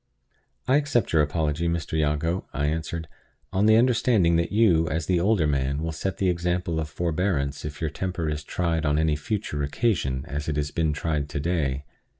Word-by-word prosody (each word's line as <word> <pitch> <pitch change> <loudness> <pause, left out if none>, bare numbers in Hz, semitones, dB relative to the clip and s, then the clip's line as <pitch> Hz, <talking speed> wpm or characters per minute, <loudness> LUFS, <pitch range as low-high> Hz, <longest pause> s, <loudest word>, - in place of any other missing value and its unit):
"I 130 +2 +5
accept 145 -10 0
your 80 - +5
apology, 75 +2 0
Mr. 85 -1 -2
Jago," 80 +3 0
I 70 - -1
answered, 80 +1 -2 0.5
"on 100 +2 +3
the 110 - +7
understanding 115 -7 +3
that 85 0 0
you, 95 -7 +4
as 80 0 -1
the 90 -2 +2
older 95 -2 +2
man, 70 0 0
will 80 - -2
set 85 +3 -3
the 95 - +1
example 85 -1 0
of 80 -1 -3
forbearance 80 -3 -1
if 75 +1 -7
your 80 -3 -1
temper 90 -3 -3
is 75 -1 -2
tried 85 0 -1
on 75 -1 +2
any 80 -1 +2
future 75 -1 -3
occasion 70 - 0
as 75 +2 -4
it 75 - -1
has 75 -1 -1
been 80 -2 +1
tried 75 -1 -2
today. 70 -3 -1
80 Hz, 185 wpm, -25 LUFS, 75-90 Hz, 0.5 s, the